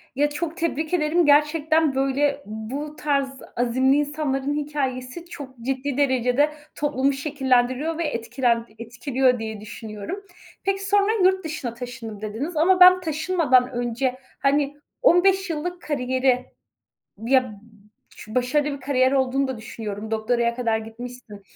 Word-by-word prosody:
Ya, 290 +2 +2
çok 325 +3 -4
tebrik 320 -2 -2
ederim. 335 0 +2
Gerçekten, 300 0 +3
böyle, 280 +1 +1
bu 250 +8 -6
tarz 280 -3 0 0.3
azimli 255 +3 +2
insanların 290 -2 -1
hikâyesi 285 0 -3
çok 270 -7 -10
ciddi 270 +1 -2
derecede 260 0 +2 0.3
toplumu 280 -1 +1
şekillendiriyor 270 +1 0
ve 340 - -1
etkilend 235 -3 0
etkiliyor 250 +2 0
diye 220 -2 -5
düşünüyorum. 215 - -7 0.4
Peki, 390 0 -1
sonra, 405 +1 +3
"Yurt 375 +1 +3
dışına 305 -7 -4
taşındım." 235 -3 -8
dediniz 235 +11 -4
ama 365 +4 +4
ben 365 0 +8
taşınmadan 310 -6 +2
önce, 245 +1 -1 0.2
hani, 285 +1 +1 0.2
15 385 -3 +4
yıllık 345 +3 -4
kariyeri, 255 -3 0 0.8
ya, 260 +1 +5
b 205 - -13 0.6
ş 215 - -10
başarılı 280 +3 +1
bir - - -14
kariyer 260 -1 +2
olduğunu 270 0 +1
da 260 -3 -4
düşünüyorum. 220 -1 -6
Doktoraya 235 +2 0
kadar 230 -2 0
gitmişsin. 225 -1 -9
270 Hz, 130 wpm, -23 LUFS, 245-300 Hz, 0.8 s, ben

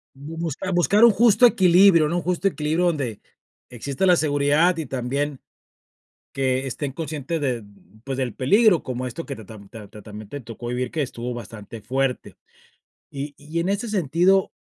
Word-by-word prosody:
Bu 150 +4 -9
busca 170 +4 -3
buscar 200 +5 +3
un 235 - +8
justo 235 +3 +5
equilibrio, 180 -5 +5
¿no?, 175 - -1
un 175 - -1
justo 180 +2 0
equilibrio 160 0 0
donde 135 -10 -2 0.5
exista 135 - -3
la 180 -1 +6
seguridad 150 +3 +2
y 160 - -3
también 135 +2 -3 0.9
que 130 0 0
estén 135 +2 -4
conscientes 155 0 -4
de, 125 -5 -1 0.4
pues, 135 0 -4
del 130 -4 -2
peligro, 200 - +3
como 125 0 -4
esto 165 +7 -7
que 140 - -6
ta 110 - -12
ta 110 - -11
tam 100 -1 -15
ta 110 -3 -11
ta 105 - -12
también 105 0 -10
te 145 - -6
tocó 115 0 -9
vivir 125 0 -3
que 160 - -2
estuvo 125 -2 -4
bastante 115 -1 -9
fuerte, 130 +4 -2 0.8
y 140 +1 -6
y 155 +3 -6
en 175 - -1
ese 205 +4 -1
sentido, 185 0 +2
145 Hz, 180 wpm, -23 LUFS, 125-175 Hz, 0.9 s, un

